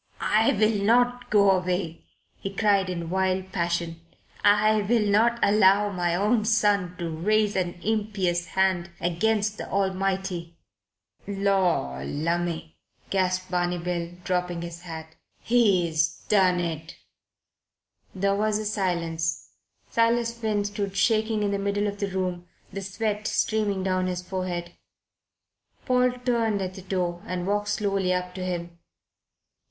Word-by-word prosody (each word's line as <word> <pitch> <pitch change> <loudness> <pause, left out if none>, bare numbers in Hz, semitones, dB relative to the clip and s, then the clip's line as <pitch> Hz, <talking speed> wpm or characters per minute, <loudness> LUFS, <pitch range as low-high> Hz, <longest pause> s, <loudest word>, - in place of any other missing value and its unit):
"I 220 +1 +4
will 215 0 +2
not 245 +3 +2
go 200 -2 +5
away," 180 -3 -1 0.3
he 195 - -4
cried 195 -2 +2
in 170 -2 -4
wild 190 0 0
passion. 170 -2 -2 0.4
"I 210 +1 +4
will 215 +1 +2
not 220 +4 +3
allow 205 0 +4
my 175 -2 0
own 210 +4 +2
son 205 -5 +2
to 170 -3 -3
raise 205 +6 +1
an 180 -2 -1
impious 200 -5 0
hand 190 -2 +2
against 210 +5 0
the - - -6
Almighty." 190 -3 -1 0.7
"Lor' 190 - 0
lumme!" 165 - -2 0.4
gasped 185 -1 0
Barney 175 0 0
Bill, 170 0 -3
dropping 180 -1 -1
his 170 0 -7
hat. 160 -2 -8 0.3
"He's 175 -9 +2
done 185 -3 +4
it." 160 -1 -4 1.2
There 195 +1 +1
was 210 +1 +1
a 215 - -4
silence. 170 -5 -1 0.4
Silas 230 0 +2
Finn 215 -3 -1
stood 200 -1 -3
shaking 220 0 +2
in 205 - 0
the 200 - -1
middle 200 +1 0
of 205 0 -3
the 200 - -1
room, 180 -2 -3 0.3
the 195 - -4
sweat 210 +2 -2
streaming 205 -3 0
down 185 -1 0
his 180 0 -3
forehead. 180 -2 -4 1.1
Paul 250 -1 +3
turned 230 -4 +1
at 185 -1 -3
the 190 - -9
door 180 -2 -2
and 180 -1 -3
walked 205 +1 0
slowly 200 -3 0
up 180 0 -2
to 185 - -5
him. 170 -2 -4
190 Hz, 135 wpm, -26 LUFS, 175-210 Hz, 1.2 s, go